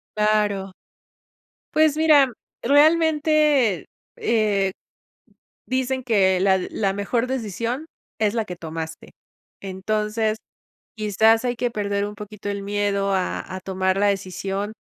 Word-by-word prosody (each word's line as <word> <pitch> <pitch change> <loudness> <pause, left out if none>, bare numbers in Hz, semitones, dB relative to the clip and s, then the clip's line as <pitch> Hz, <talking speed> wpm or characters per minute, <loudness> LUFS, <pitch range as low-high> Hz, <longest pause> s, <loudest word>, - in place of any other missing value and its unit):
Claro. 210 -2 +1 1.0
Pues 310 -1 +4
mira, 295 -5 +5 0.3
realmente, 300 - +3 0.3
eh-eh, 205 -4 +1 0.9
dicen 260 0 -1
que 195 -5 +3
la 190 0 +3
la 195 -3 0
mejor 230 +5 -1
decisión 245 - -3 0.3
es 215 +1 +2
la 225 - 0
que 180 - -7
tomaste. 160 -1 -7 0.5
Entonces, 215 +3 -1 0.6
quizás 220 +2 +3
hay 245 -1 0
que 240 0 -1
perder 205 -1 -1
un 210 - -8
poquito 210 0 -8
el 200 0 -3
miedo 200 -1 0
a 185 -1 -1 0.2
a 185 - -5
tomar 190 0 -1
la 205 - +3
decisión. 195 +1 -3
210 Hz, 115 wpm, -23 LUFS, 195-245 Hz, 1.0 s, mira